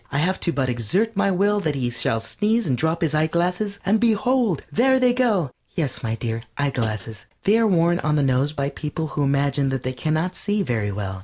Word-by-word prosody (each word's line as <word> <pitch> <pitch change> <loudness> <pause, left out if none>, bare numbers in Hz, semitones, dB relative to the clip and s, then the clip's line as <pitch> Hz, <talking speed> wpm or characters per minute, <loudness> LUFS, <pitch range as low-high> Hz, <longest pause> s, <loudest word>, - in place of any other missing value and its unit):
I 140 - -1
have 180 +6 +1
to 170 - 0
but 135 -3 -1
exert 155 - 0
my 200 0 +2
will 200 +2 +2
that 155 -7 -1
he 125 -3 -1
shall 115 -1 0
sneeze 215 - 0
and 135 -6 +1
drop 160 +5 -1
his 155 -2 0
eyeglasses, 175 +6 0
and 215 +3 +3
behold, 230 - +2
there 260 +3 +3
they 250 -1 +4
go." 215 - +1 0.2
Yes, 155 -7 -2
my 115 -2 -2
dear, 115 0 -3 0.2
eyeglasses. 110 -7 -2 0.2
They 215 +3 +4
are 225 - +3
worn 175 -2 +3
on 150 0 0
the 145 - +2
nose 135 +2 +2
by 140 -2 -2
people 155 +2 -4
who 150 - -3
imagine 140 0 +1
they 130 -1 -2
can 155 +4 -1
not 175 +3 -1
see 205 +1 -1
very 110 - -1
well. 95 -2 -4
155 Hz, 215 wpm, -22 LUFS, 130-200 Hz, 0.2 s, they